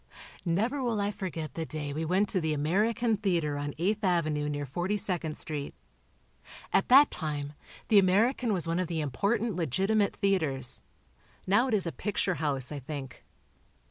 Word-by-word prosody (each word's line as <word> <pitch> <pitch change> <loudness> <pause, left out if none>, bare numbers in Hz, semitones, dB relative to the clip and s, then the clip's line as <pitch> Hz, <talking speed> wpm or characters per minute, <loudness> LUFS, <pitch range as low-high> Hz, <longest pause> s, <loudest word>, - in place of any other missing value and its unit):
Never 220 +11 0
will 235 -4 0
I 205 0 0
forget 170 -8 -5
the 165 - -3
day 150 -2 -5
we 160 +2 -2
went 190 +5 +2
to 185 - 0
the 160 -1 0
American 210 +9 +1
Theatre 170 -8 0
on 145 0 -4
Eighth 205 +6 0
Avenue 155 -5 +1
near 145 0 -3
42nd 175 +1 -1
Street. 150 -3 -4 1.0
At - - +2
that 275 +3 +8
time, 145 -3 -4 0.4
the 210 - +7
American 220 +6 +2
was 180 -5 0
one 165 +2 0
of 185 - -1
the 165 -1 -2
important 200 - 0
legitimate 195 - +1
theatres. 155 -11 0 0.6
Now 205 +7 +3
it 235 - +1
is 195 - +3
a 165 - -1
picture 195 -1 -1
house, 135 -4 +2
I 145 - -4
think. 135 -1 -7
175 Hz, 165 wpm, -29 LUFS, 150-205 Hz, 1.0 s, that